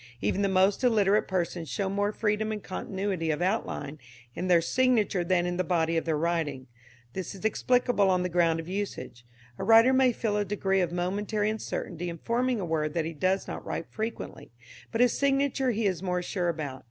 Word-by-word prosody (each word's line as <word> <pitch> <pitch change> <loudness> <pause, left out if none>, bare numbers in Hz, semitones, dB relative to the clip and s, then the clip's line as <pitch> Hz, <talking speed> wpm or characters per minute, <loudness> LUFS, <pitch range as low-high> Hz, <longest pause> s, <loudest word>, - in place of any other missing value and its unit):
Even 105 - 0
the 200 - +2
most 190 +4 +3
illiterate 210 -4 +3
persons 175 -3 -2
show 195 +6 -1
more 205 +2 0
freedom 215 0 -1
and 210 -2 -5
continuity 190 -3 -3
of 150 -1 0
outline 155 -6 -2 0.3
in 180 - -3
their 175 -2 +5
signature 215 -1 +2
than 175 0 +1
in 175 0 -2
the 185 - +1
body 165 -2 +1
of 165 - 0
their 160 -2 0
writing. 155 -5 -1 0.5
This 190 +1 -5
is 195 - -9
explicable 245 -2 +2
on 180 -1 +2
the - - 0
ground 170 -2 +2
of 165 - -7
usage. 190 - -5 0.4
A - - -3
writer 230 +3 +6
may 260 -1 +4
feel 220 -2 -1
a 205 - +1
degree 195 -1 0
of 175 -2 -1
momentary 205 +4 -1
uncertainty 175 -5 -4
in 170 - -6
forming 240 +5 0
a 190 - -2
word 155 -1 -1
that 165 -2 0
he 165 - -4
does 185 +5 0
not - - -6
write - - -4
frequently, 220 +1 -5 0.4
but 230 - 0
his 245 -1 +4
signature 275 -1 +1
he 225 -2 0
is 185 -4 0
more 180 -1 -1
sure 175 -1 -1
about. 145 -5 -4
190 Hz, 200 wpm, -28 LUFS, 170-215 Hz, 0.5 s, writer